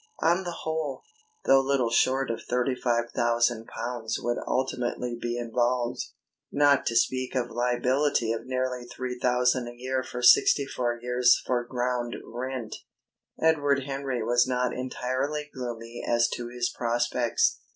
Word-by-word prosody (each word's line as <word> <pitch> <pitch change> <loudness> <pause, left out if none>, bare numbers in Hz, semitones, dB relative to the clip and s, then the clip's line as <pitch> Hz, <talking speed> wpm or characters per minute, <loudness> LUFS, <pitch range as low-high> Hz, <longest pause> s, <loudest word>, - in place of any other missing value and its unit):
On 175 +3 +3
the 175 -2 -5
whole, 160 -4 -3 0.4
though 135 - +6
little 135 -3 +1
short 130 +2 +2
of 115 - -4
thirty 125 +2 0
five 120 -2 0
thousand 120 -1 +1
pounds 115 -1 -4
would 120 0 -1
ultimately 125 -2 -1
be 120 0 -2
involved, 120 +1 0 0.5
not 145 -1 +3
to 115 - 0
speak 130 +2 +1
of 120 -2 -1
liability 125 +1 +1
of 115 +1 -4
nearly 130 -1 -2
three 125 0 -5
thousand 125 0 +2
a 120 - -8
year 130 +2 -2
for 125 -1 -6
sixty 140 +3 +6
four 120 -3 -2
years 125 0 +3
for 125 -1 0
ground 120 -1 -2
rent, 125 -1 -5 0.6
Edward 145 -4 +2
Henry 135 -3 -3
was 120 +2 +3
not 125 -1 0
entirely 130 +4 -3
gloomy 120 -2 -6
as 120 0 +2
to 120 - -4
his 120 0 -1
prospects. 120 0 +1
125 Hz, 145 wpm, -27 LUFS, 120-130 Hz, 0.6 s, though